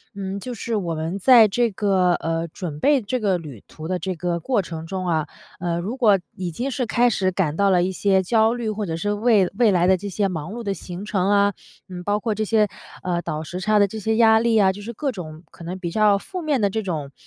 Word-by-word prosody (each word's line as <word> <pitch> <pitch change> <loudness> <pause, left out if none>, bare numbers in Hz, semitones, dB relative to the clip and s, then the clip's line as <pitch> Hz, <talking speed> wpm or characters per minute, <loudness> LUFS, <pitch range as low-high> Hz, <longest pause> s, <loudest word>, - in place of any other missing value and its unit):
嗯， 195 0 -4
就 250 +4 -6
是 230 0 -3
我 175 -5 -2
们 160 +4 -3
在 230 +2 +7
这 230 +2 +1
个， 190 -3 +2
呃， 165 0 -2
准 160 -4 -6
备 285 - +3
这 245 +4 -2
个 195 -5 +1
旅 145 - -10
途 155 0 -9
的 185 - -1
这 180 +2 -4
个 170 0 -2
过 210 +4 0
程 165 -2 -7
中 185 +1 -4
啊， 155 -3 0 0.3
呃， 170 -1 -1
如 200 +8 -4
果 210 -7 +4 0.2
已 185 -3 -4
经 245 +11 -3
是 260 -1 -2
开 240 +2 +3
始 185 -4 0
感 165 -5 -1
到 200 +1 +3
了 180 -2 +4
一 185 - -1
些 190 +1 +2
焦 220 +4 +2
虑 240 -2 -3
或 210 0 -3
者 165 -3 -3
是 205 +5 -1
为 210 -3 +3
未 230 -4 +4
来 180 -1 +3
的 190 - +5
这 200 +2 -6
些 200 +2 0
忙 170 -1 -5
碌 235 - -6
的 200 -2 -1
行 185 +1 -8
程 195 -2 0
啊， 200 -1 +3 0.3
嗯， 180 -1 -8
包 205 +2 0
括 215 0 -2
这 215 - -1
些， 215 0 +3 0.4
呃， 175 -1 -1
倒 155 -1 -4
时 180 +3 -6
差 215 +2 +2
的 200 - +4
这 220 +3 -7
些 220 +1 0
压 220 -1 +6
力 230 -1 +2
啊， 195 -3 +5
就 205 +2 -9
是 225 - -6
各 275 +4 -2
种 160 -5 -9
可 - - -13
能 180 +3 -6
比 175 -2 -3
较 210 +1 +4
负 365 - -7
面 300 -5 0
的 200 - +3
这 220 +3 -2
种， 150 -7 -4
195 Hz, 280 characters per minute, -22 LUFS, 175-220 Hz, 0.4 s, 在